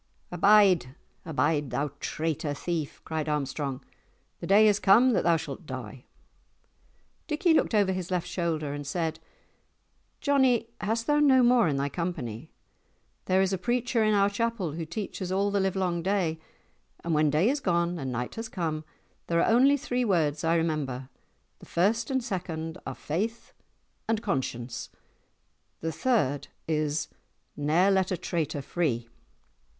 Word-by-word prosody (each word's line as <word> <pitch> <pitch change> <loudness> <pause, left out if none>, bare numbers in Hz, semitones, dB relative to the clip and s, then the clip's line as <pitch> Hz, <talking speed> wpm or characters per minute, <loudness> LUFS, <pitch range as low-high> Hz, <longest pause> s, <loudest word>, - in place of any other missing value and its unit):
"Abide, 180 -7 +4 0.3
abide, 150 -2 +1
thou 140 +4 -2
traitor 155 -2 -2
thief!" 160 -1 -4
cried 160 -1 -3
Armstrong; 140 -2 -2 0.5
"the - - -6
day 210 +3 +6
is 210 -1 +3
come 230 +7 +5
that 210 - +1
thou 170 -1 +4
shalt - - -7
die!" - - -7 1.2
Dickie 320 +2 +2
looked 275 - +2
over 200 -2 +3
his 185 -2 -4
left 180 -2 -1
shoulder 165 -5 -2
and 145 -1 -6
said, 160 +1 -2 1.0
"Johnie, 260 -5 +2
hast 225 +2 -1
thou 295 0 +3
no 265 -4 +5
more 240 -4 +5
in 145 -3 0
thy 140 +1 0
company? 145 - -4 0.8
There 190 +1 +3
is 190 0 0
a 190 - -1
preacher 240 +2 0
in 215 -1 +3
our 200 0 +4
chapel 205 -4 -1
who 160 +1 -5
teaches 185 +1 -5
all 200 +2 +1
the 200 - +1
livelong 190 -3 0
day, 180 -4 0 0.6
and 170 - -1
when 155 0 +3
day 155 +7 +2
is 280 +4 +1
gone 170 -5 0
and 135 -3 -3
night 125 0 -3
has 225 0 -6
come, 160 -4 -3 0.4
there 170 0 +1
are - - +3
only 275 +4 +5
three 250 -2 -1
words 155 -8 +1
I 165 +1 +2
remember—the 145 -6 -5
first 210 - +1
and 260 -2 0
second 165 -4 -4
are 135 - -4
Faith 215 +10 -4 0.6
and 225 -1 0
Conscience—the 130 - -6
third 160 - 0 0.2
is 150 -1 0 0.5
'Ne'er 160 +7 +3
let 190 -2 +2
a 185 - -1
traitor 155 -6 -2
free. 130 -8 -1
175 Hz, 150 wpm, -28 LUFS, 155-210 Hz, 1.2 s, day